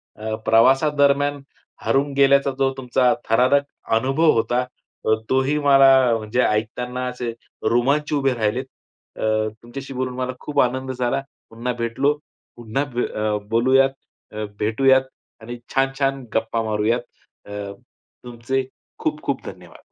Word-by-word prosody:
अ, 110 +1 -5
प्रवासादरम्यान 140 +4 +3 0.4
हरवून 140 +1 +1
गेल्याचा 140 0 +4
जो 135 0 +2
तुमचा 125 -1 +2 0.2
थरारक 125 +5 +4 0.3
अनुभव 135 +7 +3
होता, 120 +2 +1
तर 110 -3 -3
तोही 130 +3 +2
मला 135 -1 +6 0.3
म्हणजे 110 +3 -1
ऐकताना 125 +4 -1
असे 125 -2 -4 0.4
रोमांच 140 +6 +1
उभे 135 -2 +2
राहिलेत. 120 +3 -1 0.5
अ, 110 0 +1 0.2
तुमच्याशी 135 +3 -8
बोलून 130 0 -3
मला 130 0 -3
खूप 145 -1 -3
आनंद 130 +1 -1
झाला. 125 +1 -1 0.3
पुन्हा 120 +2 -3
भेटलो. 115 +5 +1 0.4
पुन्हा 120 +4 -2
ब 120 - 0 0.4
बोलूयात, 130 +4 +4 0.4
अ, 110 0 -5 0.2
भेटूयात 130 +5 +4 0.4
आणि 120 +2 -7 0.2
छान-छान 135 0 0
गप्पा 115 +1 0
मारूयात. 110 +2 0 0.4
अ, - - -12 0.7
तुमचे 125 +2 -3 0.3
खूप-खूप - - -2
धन्यवाद. - - -11
130 Hz, 120 wpm, -22 LUFS, 115-135 Hz, 0.7 s, मला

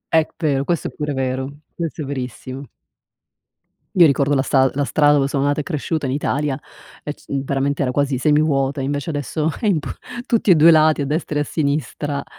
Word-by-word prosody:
È 160 -1 +4
vero, 145 -5 0
questo 170 +2 -1
è - - -13
pure 150 -1 -3
vero, 130 +2 -3
questo 165 -2 -4
è - - -5
verissimo. 130 0 -6 1.3
Mi 175 -3 +8
ricordo 140 0 +2
la 135 - +3
sta 135 -1 +3
la 145 +1 0
strada 145 +1 +4
dove 140 -2 +2
sono 140 -1 -1
nata 145 +1 +1
e - - -1
cresciuta 155 -1 -2
in 130 - -1
Italia 145 0 -1 0.4
e 150 - -4
c - - -22
veramente 140 +1 -1
era 125 - 0
quasi 140 0 0
semivuota, 145 -1 +2
e - - -2
invece 145 +3 -2
adesso 150 +2 -2
è 220 - +1
impo 165 -8 0 0.4
tutti 230 -5 +1
e 180 - +8
2 160 +2 +7
lati 155 -1 +4
a - - -1
destra 150 +1 -2
e - - +2
a - - +2
sinistra 145 -1 -2
145 Hz, 205 wpm, -20 LUFS, 135-155 Hz, 1.3 s, Mi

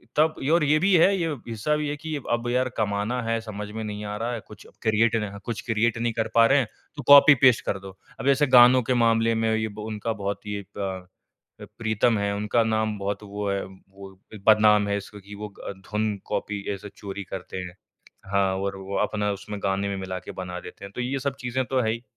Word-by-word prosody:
तब 155 +1 +3 0.2
और 170 -2 +4
ये 150 +1 +4
भी 195 +2 +3
है 195 +4 +5
ये 170 - 0 0.2
हिस्सा 115 +6 -1
भी 150 -1 -2
है 145 - -2
कि 155 +1 -5 0.2
अब 120 0 0
यार 130 +1 +1
कमाना 105 +3 -1
है, 115 0 0
समझ 105 -2 -6
में 110 +1 -5
नहीं 105 0 -5
आ 105 0 -4
रहा 115 +2 -2
है, 115 - -3
कुछ 105 -1 -13 0.2
क्रिएट 110 +1 +2
नह 100 0 -6
कुछ 115 -2 -4
क्रिएट 115 -1 +1
नहीं 115 0 -1
कर 115 -1 -1
पा 115 0 +7
रहे 140 +3 +4
है, 125 - +1 0.3
तो 145 - -6
कॉपी 145 +1 +9
पेस्ट 125 -3 +6
कर 100 - -1
दो। 95 0 -11 0.2
अब - - -3
ऐसे 145 +2 +3
गानों 125 0 +7
के 125 - 0
मामले 115 -1 +3
में 110 0 +1
ये 110 0 -1
ब 105 0 -10
उनका 110 +1 -3
बहुत 100 0 -3
ही 105 - -4
ये 100 - -5
प 95 -2 -4 0.5
अ, 105 - -7
प्रीतम 110 0 +2
हैं, 100 0 0
उनका 105 +3 +1
नाम 110 -1 0
बहुत 100 +1 -3
वो 100 0 -4
है, 100 0 -1
वो 95 +1 -14 0.4
बदनाम 105 -1 +6
है 100 - 0
इसका 100 +1 -9
कि 100 +1 -11
वो 105 +1 -6 0.2
अ, - - -3
धुन 105 +2 -3
कॉपी 100 -1 -3
ऐसे 100 +1 -8
चोरी 100 0 -6
करते 95 0 -7
हैं। 90 -1 -6 0.6
हाँ, 95 -1 +2
और 100 0 -2
वो 95 +1 -5
अपना 105 -1 -1
उसमें 105 +1 -6
गाने 100 +1 0
में 100 - -3
मिला 95 -1 -4
के - - -9
बना 90 -1 -6
देते 100 +2 -10
हैं, 100 - -10
तो 125 - -2
ये 135 +2 -2
सब 140 0 -2
चीज़ें 125 +1 -1
तो 130 -1 0
है 110 - +1
ही। 115 +1 -5
110 Hz, 240 wpm, -25 LUFS, 100-120 Hz, 0.6 s, कॉपी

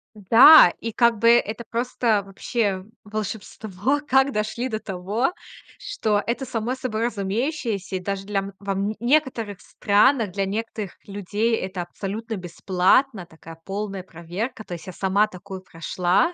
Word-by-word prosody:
Да, 225 - +8
и 230 - -3
как 235 -1 +2
бы 230 - +5
это 235 -1 +2
просто 230 -3 0
вообще 195 -1 -2 0.2
волшебство, 215 +3 -3
как 265 0 +3
дошли 220 +4 -2
до 215 -3 -3
того, 205 - -2 0.5
что 220 - -1
это 245 +3 -2
само 235 0 -2
собой 235 -4 -2
разумеющееся. 225 - -2
И 185 - -1
даже 195 +1 -4
для 205 -1 -1
м 195 0 -6
вам 200 +1 -2
некоторых 240 -6 0
странах, 215 +1 +2
для 195 0 -1
некоторых 210 -1 -4
людей 205 +3 -1
это 185 -4 -4
абсолютно 215 +6 -5
бесплатно, 185 +5 +1
такая 165 0 -13
полная 195 0 -4
проверка. 185 +7 -6
То - - -7
есть 170 - -8
я 185 - -7
сама 200 +3 +2
такую 190 -1 -9
прошла. 180 - 0
210 Hz, 145 wpm, -23 LUFS, 190-235 Hz, 0.5 s, Да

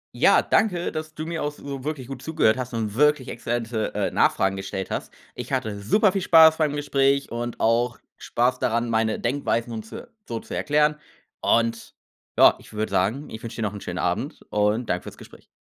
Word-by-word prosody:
Ja, - - +5
danke, 180 -5 +1
dass 155 0 -6
du 155 - -5
mir 165 0 -4
auch 145 - -1
so 140 -2 -8
wirklich 150 -3 -4
gut 135 -2 -7
zugehört 155 -9 +2
hast 125 -2 -5
und 110 -3 -2
wirklich 145 0 +2
exzellente, 115 -2 -3
äh, - - 0
Nachfragen 95 0 +2
gestellt 95 0 -5
hast. - - -4 0.2
Ich 125 +1 -8
hatte 110 -6 -2
superviel 195 - +2
Spaß 160 -2 +7
beim 150 -2 +1
Gespräch 140 -1 +1
und 120 0 -4
auch 115 +1 +2 0.2
Spaß 125 +2 0
daran, 115 0 0
meine 110 -1 +1
Denkweisen 120 -2 -1
und 110 -1 -6
zo - - -8 0.2
so 115 -1 -3
zu - - -8
erklären. 150 +1 +2 0.4
Und 115 0 0 0.4
ja, - - +7
ich - - -16
würde 110 0 -3
sagen, 110 +11 0
ich 110 - -8
wünsche 115 - -7
dir 115 - -3
noch 105 -2 -2
'n 100 - -8
schönen - - -5
Abend - - -2
und 105 +3 +1
danke 90 - -1
für's - - -10
Gespräch. - - -15
120 Hz, 195 wpm, -24 LUFS, 110-145 Hz, 0.4 s, Spaß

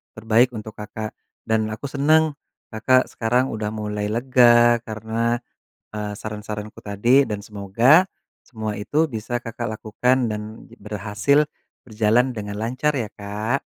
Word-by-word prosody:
terbaik 115 +3 +2
untuk 110 0 -6
Kakak 110 +1 -7 0.3
dan 110 -1 +1
aku 110 +6 -6
seneng 155 +2 +3 0.4
Kakak 130 +4 +2
sekarang 125 +3 +1
udah 105 -1 -3
mulai 105 -1 -3
lega 120 0 +5
karena, 110 +2 -1 0.6
eee, 105 -1 -4
saran-saranku 105 0 -7
tadi 120 +7 +3
dan 105 -1 -4
semoga 115 - +4 0.4
semua 110 -3 -5
itu 150 +8 0
bisa 120 +2 -4
Kakak 115 +1 -5
lakukan 125 +2 +1
dan 105 +1 -6
j - - -16
berhasil, 105 +7 +1 0.4
berjalan 115 +3 +2
dengan 105 -3 -5
lancar 130 +7 -1
ya 115 -6 -2
Kak. 105 +6 -3
110 Hz, 130 wpm, -22 LUFS, 105-125 Hz, 0.6 s, lega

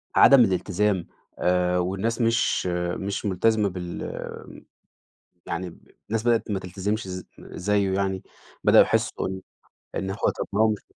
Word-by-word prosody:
عدم 140 0 +8
الإلتزام 95 0 0 0.3
آآ 90 0 +2
والناس 95 +7 -1
مش 115 +1 +2 0.3
مش 100 +1 -4
مُلتزمة 105 +2 +2
بال 90 -1 -7 0.8
يعني 90 +2 -3
ب 85 - -19 0.2
الناس 110 0 -1
بدأت 115 -2 +1
ما 95 - 0
تلتزمش 95 +4 -3
ز 90 0 -6
زيّه 100 0 -1
يعني. 95 -1 -1 0.4
بدأوا - - +7
يحسّوا - - 0
إن 95 0 -5 0.6
إن 95 +1 -2
هو 95 - -4 0.2
طب - - -3
ما 105 - 0
هو 110 - +5
مش 105 -2 -1
95 Hz, 140 wpm, -25 LUFS, 90-105 Hz, 0.8 s, عدم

